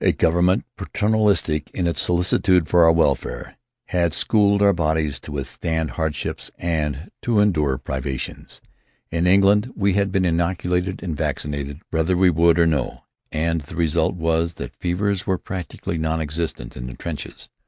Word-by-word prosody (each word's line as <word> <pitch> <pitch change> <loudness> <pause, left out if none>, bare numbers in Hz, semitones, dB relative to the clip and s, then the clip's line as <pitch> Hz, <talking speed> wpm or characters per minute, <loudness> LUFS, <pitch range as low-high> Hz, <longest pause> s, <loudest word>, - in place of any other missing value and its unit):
A - - +4
government, 85 +3 +2
paternalistic 105 -8 +1
in 90 - 0
its 85 - 0
solicitude 90 0 +2
for 85 -1 +5
our 80 - +7
welfare, 80 -4 0 0.3
had 85 -3 +1
schooled 100 -2 +3
our 100 0 +5
bodies 80 -4 0
to 75 - -10
withstand 80 +3 -3
hardships 80 -3 -3
and 80 -1 -2
to 115 -3 +1
endure 75 -10 +2
privations. 65 -1 -5 0.5
In 85 +2 +1
England 100 +5 +4
we 100 -2 +1
had 100 0 +1
been 95 -1 +1
inoculated 90 +2 0
and 85 -5 -3
vaccinated 70 +1 -3
whether 80 +3 +1
we 90 0 +5
would 85 +1 +4
or 85 - +5
no, 75 -6 -1 0.3
and 80 +1 0
the 75 +4 -11
result 85 +2 +1
was 80 0 0
that - - -7
fevers 100 +3 -1
were 95 -2 +1
practically 85 -2 -5
non 80 +1 0
existent 80 -5 -4
in - - -6
the 60 - -7
trenches. 85 -4 -7
85 Hz, 155 wpm, -22 LUFS, 80-95 Hz, 0.5 s, our